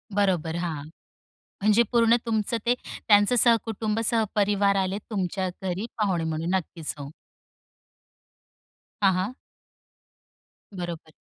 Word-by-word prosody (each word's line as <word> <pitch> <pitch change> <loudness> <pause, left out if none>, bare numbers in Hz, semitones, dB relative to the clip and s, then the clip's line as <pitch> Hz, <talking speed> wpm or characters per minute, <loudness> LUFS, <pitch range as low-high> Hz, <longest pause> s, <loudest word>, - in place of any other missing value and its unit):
बरोबर, 180 -5 +1
हां. 165 -4 -3 0.8
म्हणजे 215 +3 +5
पूर्ण 230 -1 +5
तुमचं 225 0 0
ते 240 - +4 0.3
त्यांचं 205 +3 +5
सहकुटुंब 225 -2 +2
सहपरिवार 205 -3 +2
आले 190 +1 0
तुमच्या 190 -2 -2
घरी 190 +4 -2
पाहुणे 190 -6 0
म्हणून. 160 +1 -2
नक्कीच, 165 -3 -3
हो. 140 +1 -7 1.9
हां, 195 -2 +5
हां. 190 +7 -1 1.4
बरोबर. 175 -3 -6
195 Hz, 100 wpm, -26 LUFS, 175-220 Hz, 1.9 s, म्हणजे